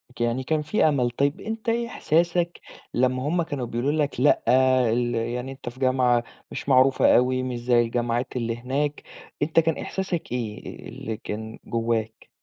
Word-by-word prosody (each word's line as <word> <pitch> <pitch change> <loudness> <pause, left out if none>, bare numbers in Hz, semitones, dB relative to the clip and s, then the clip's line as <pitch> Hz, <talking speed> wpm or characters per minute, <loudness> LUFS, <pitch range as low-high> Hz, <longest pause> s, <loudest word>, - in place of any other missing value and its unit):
ك - - -7
يعني 120 +2 0
كان 155 +3 0
في 155 +9 0
أمل. 125 -5 +1
طيب 140 +4 0
أنت 220 +1 -4
إيه 235 +1 0
إحساسك 170 -2 0 0.3
لمّا 130 +1 +1
هُم 175 +3 +1
كانوا 145 -6 -4
بيقولوا 120 +4 -1
لك 150 -4 -1
"لأ 145 +3 +4 0.5
ال 120 0 0
يعني 120 +3 -2
أنت 135 -2 -7
في 120 +2 -14
جامعة 130 -2 +3 0.3
مش - - -5
معروفة 130 0 +5
أوي 130 +1 +2
مش 125 -2 -3
زَي 120 0 +3
الجماعات 120 +1 -1
اللي 115 -2 -2
هناك." 140 +4 -2 0.4
أنت 155 +2 +3
كان 160 -1 +1
إحساسك 190 -8 -3
إيه 115 -4 -5
اللي 110 -1 -5
كان 110 +1 -6
جواك؟ 115 -1 -2
130 Hz, 170 wpm, -25 LUFS, 120-150 Hz, 0.5 s, معروفة